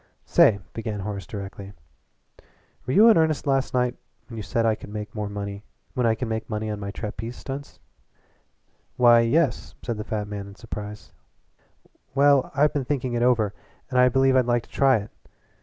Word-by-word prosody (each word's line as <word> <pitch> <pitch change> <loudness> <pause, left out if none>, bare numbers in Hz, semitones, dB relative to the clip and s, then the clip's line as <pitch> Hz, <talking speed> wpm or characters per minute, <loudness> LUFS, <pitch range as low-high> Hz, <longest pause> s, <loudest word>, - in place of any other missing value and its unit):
"Say," 100 -2 +5
began 110 -3 -4
Horace 100 0 -5
directly, 100 -1 -7 1.1
"were 130 - 0
you 215 +8 +7
in 220 - +6
earnest 160 -2 +1
last 135 -1 +1
night 125 0 +1 0.3
when 115 - -10
you - - -4
said 115 +2 -1
I 110 - +4
could 105 - -9
make 105 0 -6
money 100 -1 -5 0.3
on 110 -3 -1
my 100 -1 -5
trapeze 110 +3 -6
stunts?" 140 +3 -8 1.2
"Why, 120 -1 +7
yes," 125 +3 +1
said 120 -3 -3
the 105 - -4
fat 105 -1 -3
man 100 -1 -6
in 100 - -12
surprise. 105 +2 -8 1.0
"Well, 140 -1 +4
I've 145 +2 +3
been 145 - -1
thinking 130 -2 -2
it 120 - 0
over, 115 -5 +2 0.4
and 125 - +2
I 125 0 +6
believe 135 +1 +3
I'd 130 -2 +3
like 120 -1 +1
to - - -21
try 135 -3 +4
it. 105 0 -7
115 Hz, 165 wpm, -24 LUFS, 105-130 Hz, 1.2 s, you